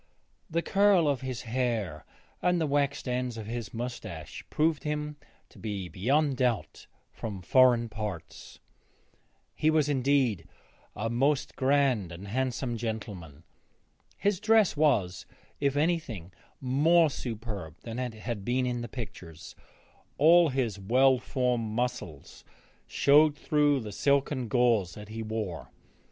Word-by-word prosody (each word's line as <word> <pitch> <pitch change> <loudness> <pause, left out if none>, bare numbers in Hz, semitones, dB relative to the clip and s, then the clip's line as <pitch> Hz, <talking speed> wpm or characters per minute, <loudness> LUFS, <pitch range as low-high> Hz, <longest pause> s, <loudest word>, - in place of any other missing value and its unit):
The 170 +1 -1
curl 195 -5 +4
of 140 -3 0
his 130 -2 -5
hair 115 - -2 0.4
and 180 -1 +2
the 160 - +1
waxed 145 -1 0
ends 125 -1 -2
of 110 - -6
his 115 0 -5
moustache 120 +1 -6
proved 155 -2 +1
him 150 0 -3 0.3
to - - -17
be 100 -5 -4
beyond 135 - +1
doubt 125 -4 -1 0.2
from 100 -5 -6
foreign 120 +3 +4
parts. 105 -7 -7 1.0
He 155 - +1
was 155 -2 +3
indeed 130 - +1 0.5
a 110 - -2
most 135 +4 +1
grand 130 - +2
and 90 +4 -9
handsome 125 0 -2
gentleman. 105 -10 -6 0.7
His 200 -2 0
dress 220 -3 +4
was, 95 -12 +1 0.3
if 140 -1 +1
anything, 145 - -1 0.3
more 150 +5 +3
superb 110 - -6
than 115 +1 -5
it 125 -3 -3
had 110 -2 -5
been 125 +4 0
in 120 -1 -2
the 120 - -6
pictures; 90 - -9 0.6
all 165 +2 +6
his 125 -7 -1
well 130 +6 +4
formed 125 -3 -1
muscles 120 - -4 0.4
showed 150 +1 +4
through 145 -3 +2
the 105 -2 -7
silken 140 +2 +1
gauze 110 -7 +2
that 105 0 -10
he 110 +1 -5
wore. 110 -6 -4
125 Hz, 130 wpm, -28 LUFS, 110-145 Hz, 1.0 s, all